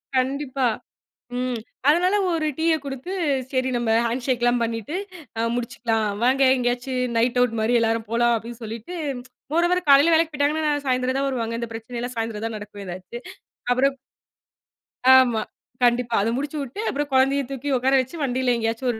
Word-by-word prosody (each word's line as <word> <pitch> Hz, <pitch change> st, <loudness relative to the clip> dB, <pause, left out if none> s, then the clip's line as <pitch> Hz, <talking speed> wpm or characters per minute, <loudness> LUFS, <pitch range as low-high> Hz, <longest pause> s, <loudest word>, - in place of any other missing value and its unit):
கண்டிப்பா. 265 Hz, 0 st, 0 dB, 0.7 s
ம். 250 Hz, -1 st, -1 dB, 0.3 s
அதனால 360 Hz, +6 st, +3 dB, 0.2 s
ஒரு 315 Hz, -2 st, 0 dB
டீய 325 Hz, 0 st, +2 dB
கொடுத்து 275 Hz, +6 st, -6 dB, 0.4 s
சரி 260 Hz, 0 st, 0 dB
நம்ம 235 Hz, -2 st, 0 dB, 0.2 s
ஹண்ஷெக்லாம், 240 Hz, 0 st, +1 dB
அ -, -, +3 dB
பண்ணிட்டு 230 Hz, -, -3 dB, 0.6 s
முடிச்சுக்கலாம். 225 Hz, -2 st, -1 dB, 0.2 s
வாங்க. 265 Hz, +2 st, +3 dB
எங்கேயாச்சும் 250 Hz, 0 st, -1 dB
நைட் 240 Hz, +2 st, +2 dB
ஆவுட் 230 Hz, -2 st, +1 dB
மாரி 235 Hz, +2 st, +2 dB
எல்லாரும் 225 Hz, -1 st, 0 dB
போலாம், 240 Hz, 0 st, +3 dB
அப்படின்னு 235 Hz, +1 st, -9 dB
சொல்லிட்டு, 225 Hz, +10 st, -7 dB, 0.6 s
மோரோவர், 350 Hz, +2 st, +2 dB
காலைல 285 Hz, +4 st, +7 dB
வேலைக்குப் 320 Hz, -1 st, +2 dB
போயிட்டாங்கன்னா 300 Hz, +2 st, +1 dB, 0.2 s
சாயந்தரம் 255 Hz, +1 st, +1 dB
தான் 275 Hz, -, 0 dB
வருவாங்க. 230 Hz, -3 st, -2 dB
இந்தப் 230 Hz, -1 st, -5 dB
பிரச்சனை 230 Hz, +2 st, -6 dB
எல்லாம் 245 Hz, 0 st, -5 dB
சாயந்தரம் 225 Hz, -1 st, -3 dB
தான் 220 Hz, -1 st, -5 dB
நடக்கும் 205 Hz, -1 st, -9 dB
எதாச்சும். 185 Hz, +7 st, -8 dB, 0.5 s
அப்புறம் 270 Hz, +2 st, +3 dB, 1.2 s
ஆமா. 240 Hz, -4 st, +3 dB, 0.4 s
கண்டிப்பா 240 Hz, -1 st, +2 dB
அத 225 Hz, -, +1 dB
முடிச்சுவுட்டு, 285 Hz, -, -4 dB
அப்புறம் 290 Hz, 0 st, -2 dB
குழந்தையைத் 270 Hz, 0 st, +2 dB
தூக்கி 275 Hz, +1 st, -4 dB
உக்கார 265 Hz, +2 st, +1 dB
வச்சு 260 Hz, +7 st, -8 dB
வண்டியில 255 Hz, -1 st, +1 dB
எங்கேயாச்சும் 230 Hz, +3 st, -1 dB
ஒரு 220 Hz, -, -6 dB
250 Hz, 150 wpm, -23 LUFS, 230-275 Hz, 1.2 s, காலைல